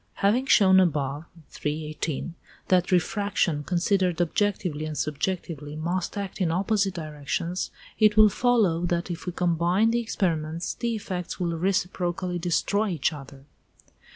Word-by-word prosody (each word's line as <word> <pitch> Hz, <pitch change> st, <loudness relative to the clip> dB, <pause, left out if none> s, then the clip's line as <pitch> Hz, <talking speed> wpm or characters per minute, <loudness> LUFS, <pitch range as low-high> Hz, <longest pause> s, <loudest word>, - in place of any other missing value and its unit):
Having 235 Hz, +7 st, +2 dB
shown 190 Hz, -6 st, +6 dB
above 150 Hz, -4 st, 0 dB, 0.2 s
(318) 155 Hz, +1 st, -4 dB, 0.4 s
that 180 Hz, -1 st, +3 dB
refraction, 180 Hz, -4 st, +1 dB
considered 180 Hz, +1 st, +1 dB
objectively 175 Hz, -3 st, 0 dB
and 155 Hz, -1 st, -5 dB
subjectively, 150 Hz, -1 st, -3 dB
must 175 Hz, +5 st, -2 dB
act 200 Hz, 0 st, -5 dB
in 175 Hz, -, +2 dB
opposite 195 Hz, +2 st, +1 dB
directions, 160 Hz, +3 st, -3 dB, 0.3 s
it 215 Hz, -1 st, +4 dB
will 215 Hz, 0 st, +9 dB
follow 210 Hz, -6 st, +2 dB
that 175 Hz, +1 st, -1 dB
if 170 Hz, +2 st, -7 dB
we -, -, 0 dB
combine 175 Hz, +5 st, +2 dB
the 235 Hz, -, +1 dB
experiments, 170 Hz, -7 st, -2 dB
the 235 Hz, -1 st, -2 dB
effects 185 Hz, -4 st, -5 dB
will 170 Hz, -2 st, -1 dB
reciprocally 180 Hz, 0 st, -1 dB
destroy 200 Hz, +5 st, +1 dB
each 165 Hz, -3 st, 0 dB
other. 135 Hz, -1 st, -11 dB
175 Hz, 130 wpm, -26 LUFS, 160-195 Hz, 0.4 s, will